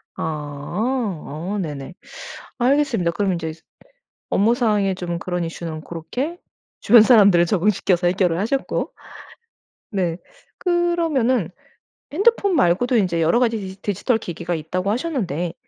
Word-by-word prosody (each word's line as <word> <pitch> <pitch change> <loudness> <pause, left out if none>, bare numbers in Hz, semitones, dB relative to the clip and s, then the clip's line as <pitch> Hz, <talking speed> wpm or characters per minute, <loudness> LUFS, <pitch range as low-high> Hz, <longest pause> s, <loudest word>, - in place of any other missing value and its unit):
아. 145 -2 -5 0.8
아 210 - -2
네네. 145 0 -6 0.7
알겠습니다. 250 -9 +2
그럼 190 +2 0
인제 160 -2 -3 0.8
업무상에 210 -2 +2
좀 175 -2 -4
그런 180 0 -3
이슈는 165 -1 -6
고렇게 245 - -5 0.4
주변 230 +1 +7
사람들을 200 -7 +6
적응시켜서 185 -1 +1
해결을 180 -2 +1
하셨고 265 +7 -1 1.0
네 180 -4 -1 0.4
그러면은 330 - +1 0.6
핸드폰 400 +1 +3
말고도 245 - +3
인제 180 -5 +1
여러 165 +9 +3
가지 230 -2 +2
디지 190 -1 -8
디지털 215 +4 0
기기가 175 -2 -4
있다고 180 +5 -3
하셨는데 205 - -2
195 Hz, 285 characters per minute, -21 LUFS, 170-245 Hz, 1.0 s, 주변